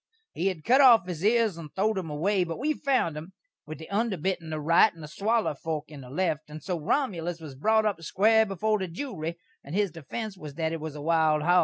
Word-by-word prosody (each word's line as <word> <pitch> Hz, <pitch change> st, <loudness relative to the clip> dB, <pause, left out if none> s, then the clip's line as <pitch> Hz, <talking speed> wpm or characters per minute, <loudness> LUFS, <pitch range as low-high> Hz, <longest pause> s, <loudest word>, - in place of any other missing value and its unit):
He 180 Hz, -, -1 dB
had 180 Hz, -5 st, -2 dB
cut 260 Hz, +4 st, +5 dB
off 235 Hz, -7 st, +7 dB
his 175 Hz, -2 st, -5 dB
ears 220 Hz, -3 st, +3 dB
and 155 Hz, -2 st, -8 dB
throwed 205 Hz, +1 st, +1 dB
'em 170 Hz, -4 st, -6 dB
away; 180 Hz, +6 st, +1 dB
but 165 Hz, -1 st, -5 dB
we 300 Hz, +5 st, 0 dB
found 265 Hz, -, 0 dB
'em, 160 Hz, +5 st, -8 dB, 0.3 s
with 155 Hz, -, -7 dB
the 160 Hz, -, -10 dB
under 210 Hz, -1 st, 0 dB
bit 185 Hz, +3 st, -1 dB
in 160 Hz, -, -9 dB
the 155 Hz, -1 st, -3 dB
right 170 Hz, +7 st, +5 dB
and 160 Hz, -3 st, -10 dB
swaller 220 Hz, +5 st, 0 dB
fork 155 Hz, +1 st, -5 dB
in 145 Hz, -2 st, -9 dB
the 125 Hz, -, -11 dB
left, 155 Hz, 0 st, -1 dB
and 155 Hz, +1 st, -9 dB
so 180 Hz, -3 st, -2 dB
Romulus 175 Hz, -, -1 dB
was 155 Hz, -4 st, -9 dB
brot 220 Hz, +10 st, +2 dB
up 200 Hz, -6 st, -1 dB
square 220 Hz, +7 st, +4 dB
before 210 Hz, +2 st, 0 dB
the 190 Hz, -, -2 dB
jewry, 170 Hz, -, -5 dB, 0.3 s
and 145 Hz, +5 st, -7 dB
his 200 Hz, -3 st, +1 dB
defense 190 Hz, -, -6 dB
was 150 Hz, -6 st, -9 dB
that 160 Hz, 0 st, -1 dB
it 165 Hz, -, -4 dB
was 155 Hz, -1 st, -6 dB
a 150 Hz, -, -7 dB
wild 160 Hz, -2 st, +2 dB
hog. 175 Hz, +2 st, +5 dB
175 Hz, 240 wpm, -27 LUFS, 155-210 Hz, 0.3 s, off